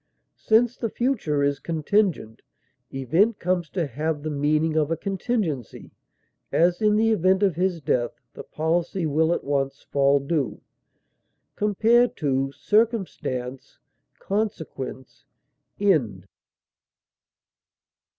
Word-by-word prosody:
Since 235 +2 +3
the 230 - -2
future 205 - 0
is 140 -1 0
contingent, 165 - -1 0.5
event 165 - +1
comes 180 -2 -1
to 175 -4 -1
have 150 +3 -3
the 155 - -3
meaning 155 +2 +1
of 155 -1 +2
a 165 - -1
contingency; 190 - -3 0.6
as, 175 +4 +2
in 210 -1 +3
the 225 +1 +3
event 190 -1 +2
of 190 -5 +2
his 180 -1 0
death, 120 -4 -1
the - - -8
policy 170 +3 -1
will 160 +2 +2
at - - -1
once 135 -1 -2
fall 140 0 +3
due. 140 -1 -2 1.0
Compare 225 +4 +3
CIRCUMSTANCE; 140 - -1 0.4
CONSEQUENCE; 160 - -4 0.5
END. 130 - +1
160 Hz, 105 wpm, -24 LUFS, 140-200 Hz, 1.0 s, Since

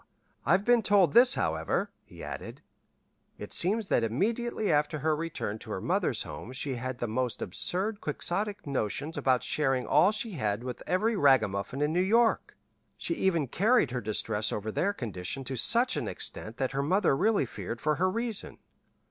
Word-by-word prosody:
I've 185 +6 +3
been 240 -1 +4
told 195 -7 +3
this, 250 +2 +7
however," - - -1
he - - -13
added. - - -8 0.7
"It - - -8
seems 205 +4 +1
that 120 - +2
immediately 215 - -1
after 150 0 +1
her 155 +2 +1
return 150 -9 -4
to - - -10
her - - -3
mother's - - 0
home 125 - -8
she 135 +1 -2
had 130 +1 -4
the 120 - -2
most 125 +2 -2
absurd 200 +4 0
quixotic 200 +7 -3
notions 140 +3 -2
about 130 -5 +1
sharing 135 -4 0
all 155 +8 +4
she 215 +1 -3
had 110 - -2
with 125 -1 -6
every 215 +5 +1
ragamuffin 130 - +2
in 150 +1 0
New 180 - +2
York. 225 +4 +2 0.4
She - - -2
even 180 - +1
carried 205 - +2
her 125 0 -2
distress 110 0 0
over 105 +1 -3
their 195 - 0
condition 115 - -5
to 130 +1 -5
such 235 - +3
an - - -2
extent 110 +2 -4
that 130 0 -1
her 135 +1 -1
mother 175 +1 +2
really 205 0 +2
feared 120 -1 -6
for 150 +2 0
her 185 +3 +2
reason. 230 +1 -3
150 Hz, 175 wpm, -29 LUFS, 125-205 Hz, 0.7 s, this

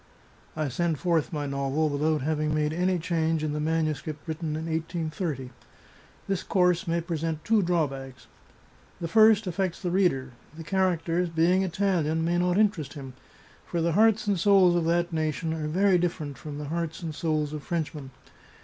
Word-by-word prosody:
I 155 -1 -1
send 160 +4 -1
forth 165 -1 0
my 150 -3 -3
novel 140 +2 0
without 150 +1 0
having 155 +1 0
made 150 0 0
any 180 +2 +1
change 165 -2 0
in 150 -1 -1
the 150 - -2
manuscript 155 0 -2
written 160 -1 -3
in 160 +1 -4
1830. 160 -4 -3 0.8
This 195 -2 -1
course 180 -2 +1
may 170 0 0
present 165 -2 -3
two 220 +1 +3
drawbacks: 135 -7 -2 0.7
The 170 - -3
first 220 +3 +5
affects 185 0 -2
the 180 -3 -2
reader. 170 -9 +1 0.3
The 165 - -7
characters, 175 -1 0
being 170 +3 +3
Italian, 170 -4 0
may 175 +1 +1
not 180 +1 +1
interest 200 -10 +1
him, 135 -4 -8 0.5
for 170 - -3
the 165 +1 +1
hearts 215 +3 +4
and 200 -3 +1
souls 190 -1 +5
of 170 -2 +1
that 170 +1 +1
nation 155 0 -1
are 155 -2 -3
very 185 +3 +3
different 160 -5 -2
from 145 0 -8
the 145 -1 -6
hearts 165 +1 -3
and 160 -2 -4
souls 155 -2 -1
of 150 - -5
Frenchmen. 150 -3 -4
165 Hz, 170 wpm, -27 LUFS, 155-180 Hz, 0.8 s, first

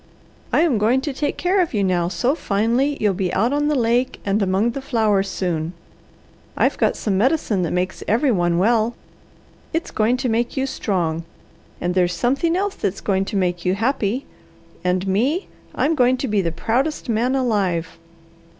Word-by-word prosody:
I - - +3
am 300 -10 +2
going 230 +5 +3
to 290 0 -3
take 290 +2 -2
care 370 +2 +2
of 335 -9 -1
you 205 - +1
now 180 -2 +1
so 195 +10 0
finely 240 +3 0
you'll 210 -2 +2
be 180 -1 -1
out 230 +7 +2
on 295 0 +1
the 300 - +1
lake 245 0 +1
and 200 +1 +1
among 195 +4 +1
the 275 - -5
flowers 215 -7 +1
soon. 170 -2 -2 0.8
I've - - +2
got - - +2
some 195 -3 0
medicine 240 - +1
that 170 - -1
makes 180 +1 -2
every 245 +5 +2
one 175 -4 +1
well. 225 +4 +2 0.8
It's 330 +1 -2
going 225 +4 +1
to 255 0 -2
make 235 +3 -1
you 265 - +1
strong, 175 -10 -1 0.6
and 175 0 -1
there's 180 -1 +2
something 275 - +1
else 395 +2 0
that's 195 - -3
going 195 -1 0
to 205 - -5
make 180 -3 0
you 185 +1 +1
happy; 235 +2 -1 0.6
and 180 +1 0
me, 260 - 0 0.3
I'm 320 - +2
going 255 -3 +3
to 265 - -2
be 210 -3 +1
the 170 -2 -1
proudest 245 - -1
man 240 +3 +1
alive." 200 -11 0
220 Hz, 185 wpm, -21 LUFS, 190-265 Hz, 0.8 s, I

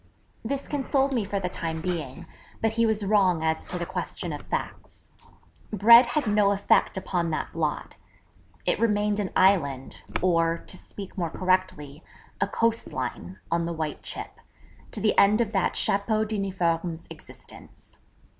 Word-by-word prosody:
This 275 +4 -3
consoled 275 -1 0
me 235 -4 +1
for 200 0 -2
the 180 - -2
time 165 -2 -4
being: 165 -2 -4 0.3
but 225 - +1
he 230 +1 +2
was 215 -2 0
wrong 190 -5 +3
as 160 0 -1
to 180 - -3
the 175 - -3
question - - -4
of - - -6
facts. - - -6 0.6
Bread 235 +4 +7
had 300 -3 0
no 210 -1 +3
effect 200 -1 +2
upon 175 -3 -1
that 155 - -3
blot. - - -3 0.7
It - - +1
remained 210 -2 +1
an 200 -2 -1
island, 140 -9 +2 0.2
or, 165 -2 +2
to - - -7
speak 195 +1 -8
more 170 -2 -1
correctly, 185 -5 -1 0.4
a - - +2
coast 230 0 -1
line, 95 -8 -5
on 170 0 +1
the 170 - -3
white 155 -2 -4
chip, - - -7 0.5
to - - -4
the 210 0 +2
end 205 +2 +5
of 230 -3 0
that 195 -4 0
chapeau 215 +2 +1
d'uniforme's 180 -5 -2
existence. - - -14
190 Hz, 155 wpm, -26 LUFS, 170-215 Hz, 0.7 s, Bread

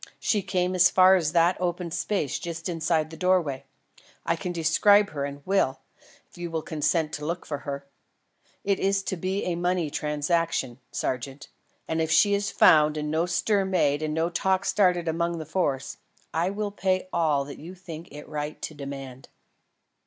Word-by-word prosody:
She 210 - +1
came 185 -1 -1
as 185 -1 +6
far 185 0 +6
as 165 -5 +1
that 175 +2 +3
open 175 -1 -2
space 170 -2 -1
just 170 -1 -5
inside 165 -2 0
the - - -8
doorway. 170 -6 +1 0.6
I - - +1
can 180 - -4
describe 200 +5 +4
her, 140 -2 -3
and 140 0 -8
will, 135 -9 +1 0.5
if - - -18
you 175 0 -4
will 160 -1 -3
consent 155 0 0
to 150 - -5
look 170 +2 -3
for 145 -2 -4
her. 140 -1 -6 0.8
It 200 -1 +1
is 195 0 +1
to 190 - -2
be 185 +3 -2
a 180 - -1
money 175 -2 0
transaction, 150 -4 -1
sergeant, 135 +2 -4 0.4
and 160 0 0
if 160 - 0
she 205 -1 +5
is 200 0 0
found 155 0 +5
and 150 0 -2
no 165 +3 +1
stir 195 +3 +1
made 160 -6 +1
and 155 0 -2
no 165 +2 0
talk 190 +2 +1
started 180 -4 +2
among 170 +1 0
the 160 - -6
Force, 145 -5 -2 0.4
I 170 +3 +1
will 205 +1 -3
pay 185 -2 0
all 150 -5 +2
that 140 - -9
you 175 +5 -9
think 170 -2 -9
it 150 +1 -10
right 150 0 -5
to - - -4
demand." 135 -2 -8
165 Hz, 180 wpm, -26 LUFS, 150-185 Hz, 0.8 s, as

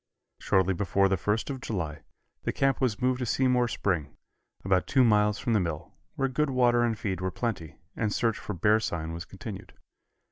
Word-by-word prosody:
Shortly 95 0 +2
before 95 +2 +2
the 95 - +2
first 105 +8 -1
of 130 -2 -6
July 80 - -4 0.4
the - - -1
camp 135 0 +1
was 120 -6 +1
moved 130 0 +2
to 125 - -1
Seymore 125 -1 +2
Spring, 90 -10 -2 0.5
about 95 -1 +2
two 130 -2 +4
miles 105 -2 +3
from 120 - -1
the 110 - +4
mill, 85 -3 -4 0.2
where 135 - +1
good 145 +3 0
water 120 -2 +3
and 115 -2 +1
feed 95 -4 -3
were 95 - 0
plenty, 95 -7 -4 0.2
and 110 -2 -1
search 115 +1 0
for 105 - -5
bear 105 +5 +3
sign 80 -6 -3
was 85 +1 -6
continued. 95 +2 -9
105 Hz, 190 wpm, -28 LUFS, 95-120 Hz, 0.5 s, two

